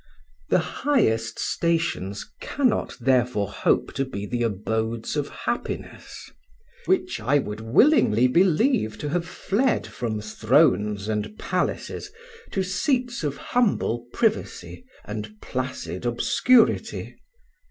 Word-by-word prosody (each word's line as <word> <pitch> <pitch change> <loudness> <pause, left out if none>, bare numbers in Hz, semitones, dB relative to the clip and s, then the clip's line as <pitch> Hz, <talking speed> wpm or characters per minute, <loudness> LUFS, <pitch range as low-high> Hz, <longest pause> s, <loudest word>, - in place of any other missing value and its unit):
"The - - +4 0.2
highest 115 - +2
stations 165 - -1
cannot 260 -5 0
therefore 125 -5 +1
hope - - +1
to 135 - 0
be 105 -7 -5
the 120 +3 -2
abodes 110 +2 -2
of 145 -1 -1
happiness, - - -5 0.6
which 370 -1 +1
I 145 - +3
would 105 -6 -3
willingly 125 - +4
believe 175 - +2
to 145 - -4
have 175 +2 -1
fled 240 +6 0
from 110 -3 -4
thrones 105 -2 +2
and 110 - -3
palaces 415 - -2 0.4
to 190 - -1
seats 240 - -1
of 140 -2 -2
humble 160 - 0
privacy 225 +2 -1 0.2
and 105 0 -6
placid 130 -1 -4
obscurity. 230 - +2
130 Hz, 110 wpm, -24 LUFS, -, 0.6 s, The